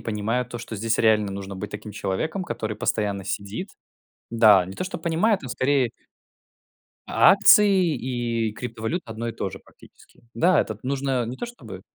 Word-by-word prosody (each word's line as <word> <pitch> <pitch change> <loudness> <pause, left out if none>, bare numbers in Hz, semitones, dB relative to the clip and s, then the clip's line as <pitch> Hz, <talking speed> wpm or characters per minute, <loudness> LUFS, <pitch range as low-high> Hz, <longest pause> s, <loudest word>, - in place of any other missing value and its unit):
понимаю 110 +3 -1
то, 120 -1 -7
что 115 -1 -7
здесь 110 +2 -1
реально 105 -2 +3
нужно 100 0 -6
быть 105 +2 -6
таким 105 0 -8
человеком, 105 - -2
который 110 -10 -4
постоянно 105 -4 -1
сидит. 100 - -4 0.6
Да. 105 -6 +6
Не 95 - -8
то 185 - -4
чтоб 185 - -5
понимает, 175 +6 +1
он 130 - -7
скорее 130 -1 +1 1.2
А - - +6
акции 195 -4 +5
и 120 -3 -2
криптовалюта- 115 +8 -4
одно 115 +1 -4
и - - -4
то - - -4
же - - -9
практически. - - -21
Да. 175 +8 +4
Этот 110 -1 -5
нужно, 135 -2 -1
не 125 +2 -6
то 240 - -5
чтобы 110 - -11
115 Hz, 170 wpm, -24 LUFS, 105-140 Hz, 1.2 s, Да